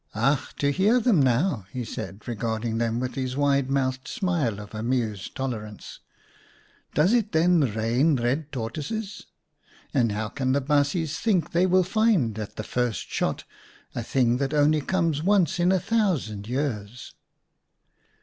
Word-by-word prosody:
" - - -29
Ach, 135 +6 0
to 140 0 +1
hear 205 - +3
them 220 - +3
now! 130 - +1
" - - -30
he 125 -2 -3
said, 100 -1 -7
regard 115 0 -2
ing 115 -1 -1
them 115 0 0
with 125 0 -3
his 130 -1 -3
wide 140 -2 +2
mouthed 130 -1 -1
smile 160 - -1
of 105 0 -10
amused 110 -3 -2
tolerance. 110 -6 -5 0.5
" - - -32
Does 160 - +4
it 225 -3 +1
then 160 -5 +3
rain 120 +8 +2
red 135 +5 -1
tortoises? 150 - -5 0.7
And 120 -6 +2
how 105 +1 -3
can 130 +2 -1
the 140 - +3
baasjes 145 +3 0
think 185 -8 +1
they 180 +2 +3
will 185 0 +4
find 185 - +1
at 105 - -6
the 110 - -4
first 120 -4 -2
shot - - -1 0.5
a - - -3
thing 120 0 +1
that 140 +2 -1
only 150 +1 +3
comes 165 -3 0
once 185 -2 +2
in 175 +1 +3
a 190 - +3
thousand 160 - -1
years 120 -3 -4
135 Hz, 165 wpm, -25 LUFS, 115-165 Hz, 0.7 s, Does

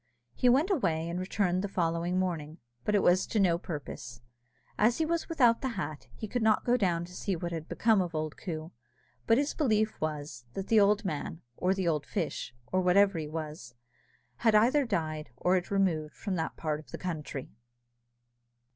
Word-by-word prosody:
He 250 - +3
went 290 +11 +4
away, 165 - +1
and 170 +1 -3
returned 185 -1 0
the - - 0
following 170 -1 0
morning, 165 -4 -2 0.3
but 210 - +2
it 205 - +3
was 180 +2 +4
to 220 - 0
no 175 -4 +3
purpose. 140 -8 -7 0.6
As 230 +3 +3
he 320 - +1
was 335 +1 -1
without 245 -8 +4
the 260 -4 -3
hat, 145 -2 -4
he 215 - -6
could 245 +4 -2
not 220 -1 +3
go 245 - +4
down 175 -7 +1
to 180 - -13
see 190 +1 -2
what 170 +1 -4
had 165 -1 -5
become 220 -3 +3
of 175 -2 -3
old 155 -1 -2
Coo, 160 -2 -6 0.6
but 225 - +5
his 285 +1 +1
belief 220 -6 +1
was, 145 -5 -4
that 195 - -4
the 225 - +6
old 205 +1 +4
man, 160 -1 -4
or 185 +6 +1
the 190 -2 -1
old 150 -3 0
fish, - - -3 0.2
or 185 - +2
whatever 195 0 +4
he 155 - -4
was, 155 -4 -6 0.6
had 225 -2 +3
either 255 +6 +4
died, 155 -7 -2
or 180 - +2
had 180 -2 +1
removed 175 -6 0
from 200 - -4
that 160 -3 -2
part 155 -2 -2
of 155 - -15
the - - -6
country. 150 -6 -5
180 Hz, 195 wpm, -30 LUFS, 160-215 Hz, 0.6 s, the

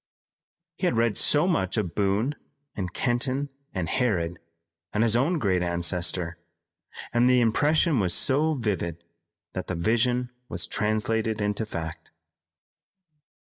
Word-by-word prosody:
He - - 0
had - - 0
read 115 -2 +2
so 150 +4 +4
much 95 - 0
of 90 -6 -1
Boone 105 +8 +1 0.4
and 90 -3 -3
Kenton 130 +5 0 0.2
and 90 -4 -3
Harrod, 85 - 0 0.5
and 105 - +1
his 115 -1 +2
own 145 +9 +2
great 95 - +1
ancestor, 85 0 0 0.7
and 120 +1 +4
the 125 0 +5
impression 145 +5 +3
was 95 -4 +1
so 150 - +2
vivid, 90 - -2 0.5
that - - -4
the - - -2
vision 120 +7 +1 0.2
was - - -2
translated 110 +1 0
into 105 +1 -1
fact. 80 -5 -6
110 Hz, 130 wpm, -26 LUFS, 90-125 Hz, 0.7 s, the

